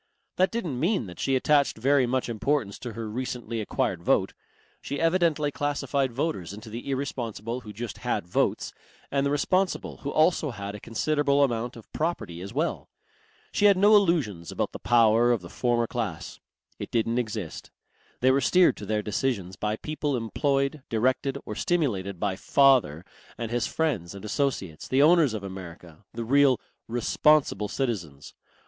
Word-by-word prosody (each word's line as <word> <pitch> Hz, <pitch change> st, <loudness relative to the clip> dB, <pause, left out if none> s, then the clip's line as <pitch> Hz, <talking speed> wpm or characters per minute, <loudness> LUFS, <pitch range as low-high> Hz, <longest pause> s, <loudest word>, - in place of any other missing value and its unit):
That 185 Hz, +1 st, +4 dB
didn't 175 Hz, -, -3 dB
mean 175 Hz, -, +1 dB
that 90 Hz, -3 st, -11 dB
she 135 Hz, -, +1 dB
attached 140 Hz, 0 st, +2 dB
very 135 Hz, +2 st, +3 dB
much 130 Hz, +1 st, 0 dB
importance 120 Hz, -1 st, -1 dB
to 120 Hz, -3 st, -6 dB
her 115 Hz, 0 st, -5 dB
recently 115 Hz, 0 st, -4 dB
acquired 105 Hz, -, -1 dB
vote. -, -, +2 dB, 0.5 s
She 140 Hz, -, -4 dB
evidently 165 Hz, -3 st, +2 dB
classified 140 Hz, -2 st, -1 dB
voters 120 Hz, -, -3 dB
into 110 Hz, +1 st, -10 dB
the 120 Hz, +5 st, -6 dB
irresponsible 120 Hz, -4 st, -3 dB
who 105 Hz, -, -9 dB
just 115 Hz, +2 st, -6 dB
had -, -, -2 dB
votes 90 Hz, -, 0 dB, 0.4 s
and 140 Hz, 0 st, +1 dB
the 140 Hz, -, +1 dB
responsible 185 Hz, +6 st, 0 dB
who 140 Hz, -, -5 dB
also 155 Hz, 0 st, +2 dB
had 100 Hz, -4 st, -6 dB
a 105 Hz, -, -7 dB
considerable 145 Hz, +6 st, +1 dB
amount 120 Hz, -2 st, -1 dB
of 115 Hz, -, -14 dB
property 150 Hz, -, -3 dB
as 100 Hz, +2 st, -7 dB
well. -, -, -2 dB, 0.6 s
She 205 Hz, -, +1 dB
had 200 Hz, -2 st, +6 dB
no 205 Hz, +3 st, +6 dB
illusions 150 Hz, -, +1 dB
about -, -, -2 dB
the -, -, -8 dB
power 115 Hz, 0 st, +4 dB
of 120 Hz, -5 st, +1 dB
the 85 Hz, -, -10 dB
former 120 Hz, 0 st, +1 dB
class. 110 Hz, -10 st, -4 dB, 0.4 s
It -, -, -5 dB
didn't 115 Hz, +1 st, +1 dB
exist. 105 Hz, -8 st, -5 dB, 0.5 s
They 130 Hz, +1 st, +5 dB
were 135 Hz, +1 st, +2 dB
steered 180 Hz, +7 st, +4 dB
to 105 Hz, -, -8 dB
their 105 Hz, 0 st, 0 dB
decisions 105 Hz, -4 st, -2 dB
by 105 Hz, +2 st, -1 dB
people 150 Hz, +1 st, -2 dB
employed, 140 Hz, +5 st, 0 dB
directed 130 Hz, +4 st, 0 dB
or -, -, -5 dB
stimulated 105 Hz, -, -1 dB
by 100 Hz, -1 st, 0 dB
"father" 125 Hz, -, +3 dB, 0.3 s
and 115 Hz, -1 st, -4 dB
his 120 Hz, 0 st, 0 dB
friends 115 Hz, -, -2 dB
and 100 Hz, +1 st, -9 dB
associates, 105 Hz, -, -2 dB
the 135 Hz, +2 st, +3 dB
owners 155 Hz, -7 st, +5 dB
of 105 Hz, -, -5 dB
America, 90 Hz, -2 st, -9 dB
the 115 Hz, 0 st, -5 dB
real 135 Hz, +1 st, +4 dB, 0.3 s
"responsible 120 Hz, -1 st, +2 dB
citizens." 90 Hz, -, -4 dB
120 Hz, 165 wpm, -26 LUFS, 105-145 Hz, 0.6 s, had